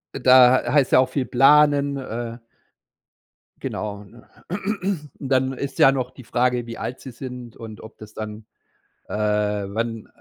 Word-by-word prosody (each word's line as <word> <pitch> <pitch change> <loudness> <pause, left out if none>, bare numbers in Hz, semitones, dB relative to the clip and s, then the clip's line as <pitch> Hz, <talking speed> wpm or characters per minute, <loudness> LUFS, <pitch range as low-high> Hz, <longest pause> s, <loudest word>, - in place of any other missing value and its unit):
Und 130 - -7
da 130 0 +7
h - - -2
heißt 140 -3 +3
ja - - +6
auch 130 0 +2
viel 130 -1 -2
planen. 140 +2 +4
Äh 120 -2 -5 1.2
Genau, 105 -1 -5
ne? 115 +4 -18 0.9
Und 135 - -6
dann 130 0 +2
ist 135 +1 -6
ja 135 - +7
noch 130 -2 -2
die 130 - -13
Frage, 125 0 0
wie 115 - -8
alt 125 - -5
sie 130 - -9
sind 125 -1 -9
und 110 -2 -10
ob 110 - -13
das 110 0 -12
dann 105 0 -7 0.6
äh, - - -5
wann, 105 +1 -1
125 Hz, 165 wpm, -22 LUFS, 110-130 Hz, 1.2 s, da